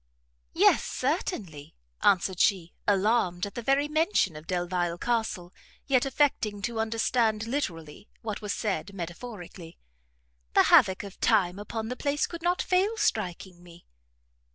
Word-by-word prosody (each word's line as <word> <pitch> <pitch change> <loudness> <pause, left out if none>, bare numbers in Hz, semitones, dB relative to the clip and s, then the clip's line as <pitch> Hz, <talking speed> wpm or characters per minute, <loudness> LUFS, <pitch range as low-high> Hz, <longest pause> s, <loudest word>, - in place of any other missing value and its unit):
"Yes, - - +5
certainly," 215 - -3 0.3
answered 190 -1 +2
she, 180 -5 +2
alarmed 200 -2 +2
at 200 - -8
the 240 - -5
very 275 +4 +2
mention 310 - +1
of 155 +1 -10
Delvile 175 -1 -1
Castle, 220 -6 -2 0.3
yet 265 -1 +2
affecting 260 -7 +1
to 230 +1 -2
understand 225 0 +1
literally 175 - -4
what 215 -2 -4
was 210 -1 -3
said 200 -2 -3
metaphorically, 175 -1 -8 0.8
"the - - +7
havoc 190 +1 +6
of 200 -2 -10
time 180 0 +2
upon 220 +2 -5
the 250 - -3
place 285 +3 0
could 335 -1 -8
not 350 +2 +1
fail 385 +5 +1
striking 190 - -2
me." 175 -1 -16
210 Hz, 135 wpm, -27 LUFS, 180-250 Hz, 0.8 s, the